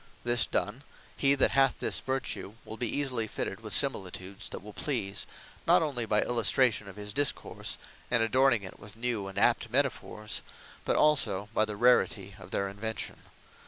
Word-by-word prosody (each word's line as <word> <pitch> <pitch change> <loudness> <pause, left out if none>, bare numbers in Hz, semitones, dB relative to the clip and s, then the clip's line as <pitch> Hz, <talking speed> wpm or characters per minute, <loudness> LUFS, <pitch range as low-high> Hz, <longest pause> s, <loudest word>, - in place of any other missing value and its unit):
This 120 -1 +3
done; 105 +6 -2 0.3
he 140 0 +4
that 135 - +3
hath 135 -1 +3
this - - 0
Vertue, 130 -6 -3
will 110 - -6
be 120 0 -2
easily 125 -6 -1
fitted 100 -1 -4
with 110 -1 -7
similitudes, 95 -6 0
that - - -7
will 105 0 -10
please, 115 -9 -3 0.4
not - - +6
onely 125 -7 -1
by 105 0 +2
illustration 115 -1 +2
of 100 - -10
his 105 0 -6
discourse, 145 +2 0 0.3
and 120 -2 +3
adorning 120 -1 +3
it 95 - -10
with 105 +1 -11
new 115 -4 -1
and 95 - -9
apt - - +3
metaphors; 105 0 -1 0.4
but - - +1
also, 125 -10 +3
by 110 - +3
the 105 -1 -5
rarity 100 -4 +3
or - - -11
their 100 +1 -1
invention. 105 +3 -4
110 Hz, 170 wpm, -29 LUFS, 100-130 Hz, 0.4 s, not